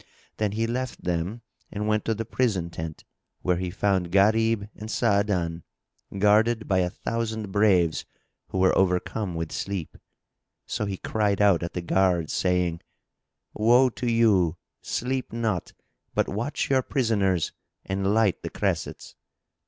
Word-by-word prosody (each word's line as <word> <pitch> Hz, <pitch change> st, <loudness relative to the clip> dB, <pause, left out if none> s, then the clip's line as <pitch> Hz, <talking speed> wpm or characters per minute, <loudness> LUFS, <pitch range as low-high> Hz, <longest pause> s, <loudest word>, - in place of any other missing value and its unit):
Then 105 Hz, -2 st, 0 dB
he 115 Hz, +2 st, 0 dB
left 125 Hz, +2 st, -3 dB
them 90 Hz, +7 st, -2 dB, 0.3 s
and 105 Hz, 0 st, -3 dB
went 110 Hz, -1 st, +1 dB
to 110 Hz, -, +1 dB
the 115 Hz, +1 st, -4 dB
prison 100 Hz, -9 st, 0 dB
tent, 80 Hz, -2 st, -6 dB, 0.4 s
where 90 Hz, -1 st, +2 dB
he 90 Hz, 0 st, -2 dB
found 95 Hz, -2 st, 0 dB
Gharib 110 Hz, +2 st, +3 dB
and 110 Hz, +1 st, -8 dB
Sa'adan, 100 Hz, -8 st, +1 dB, 0.6 s
guarded 110 Hz, +3 st, +3 dB
by 95 Hz, -2 st, +2 dB
a 90 Hz, -1 st, +1 dB
thousand 110 Hz, 0 st, -3 dB
braves, 95 Hz, -6 st, +3 dB, 0.4 s
who -, -, -4 dB
were 95 Hz, 0 st, +4 dB
overcome 90 Hz, +1 st, 0 dB
with 80 Hz, -1 st, -3 dB
sleep. 100 Hz, -5 st, -4 dB, 0.7 s
So 105 Hz, -, -2 dB
he 95 Hz, -1 st, -3 dB
cried 105 Hz, -1 st, 0 dB
out 100 Hz, -4 st, +4 dB
at 85 Hz, -, -4 dB
the 90 Hz, -, -3 dB
guards, 90 Hz, -3 st, +1 dB
saying, 90 Hz, -2 st, +1 dB, 0.7 s
"Woe 120 Hz, +4 st, +4 dB
to 120 Hz, 0 st, -2 dB
you! 100 Hz, -8 st, +3 dB, 0.2 s
Sleep 130 Hz, +1 st, -2 dB
not; 110 Hz, -6 st, -2 dB, 0.4 s
but -, -, +2 dB
watch 115 Hz, +9 st, -2 dB
your 135 Hz, -1 st, +3 dB
prisoners 100 Hz, -, +1 dB, 0.3 s
and 95 Hz, +1 st, 0 dB
light 110 Hz, -3 st, +2 dB
the -, -, -4 dB
cressets." -, -, -3 dB
100 Hz, 145 wpm, -26 LUFS, 90-110 Hz, 0.7 s, were